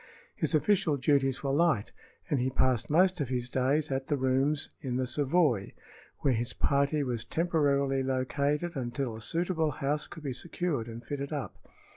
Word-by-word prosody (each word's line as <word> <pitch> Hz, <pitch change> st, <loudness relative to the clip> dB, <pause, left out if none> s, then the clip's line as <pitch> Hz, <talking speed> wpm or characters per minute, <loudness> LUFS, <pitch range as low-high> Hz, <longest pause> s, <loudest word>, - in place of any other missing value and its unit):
His -, -, 0 dB
official 160 Hz, -1 st, +2 dB
duties 135 Hz, 0 st, +1 dB
were 135 Hz, -, 0 dB
light, 150 Hz, -8 st, +2 dB, 0.4 s
and 145 Hz, -6 st, +1 dB
he 130 Hz, +1 st, +1 dB
passed 130 Hz, -2 st, +1 dB
most 180 Hz, +2 st, +3 dB
of 140 Hz, -, -2 dB
his 125 Hz, -1 st, -2 dB
days 140 Hz, +4 st, +1 dB
at 135 Hz, 0 st, -2 dB
the 145 Hz, -, +1 dB
rooms 135 Hz, +3 st, +1 dB
in 125 Hz, -3 st, -3 dB
the 130 Hz, 0 st, 0 dB
Savoy, 135 Hz, -, +1 dB, 0.5 s
where 135 Hz, -, +3 dB
his 120 Hz, +2 st, -2 dB
party 140 Hz, +1 st, +1 dB
was 120 Hz, -4 st, -2 dB
temporarily 140 Hz, -3 st, +1 dB
located 140 Hz, +5 st, -1 dB
until 125 Hz, -2 st, -3 dB
a 110 Hz, -, -9 dB
suitable 165 Hz, +3 st, 0 dB
house 145 Hz, +1 st, -2 dB
could 160 Hz, -, -11 dB
be 135 Hz, -3 st, -2 dB
secured 150 Hz, -2 st, -2 dB
and 115 Hz, +1 st, -8 dB
fitted 140 Hz, +2 st, -4 dB
up. 140 Hz, -9 st, -6 dB
140 Hz, 170 wpm, -30 LUFS, 130-150 Hz, 0.5 s, most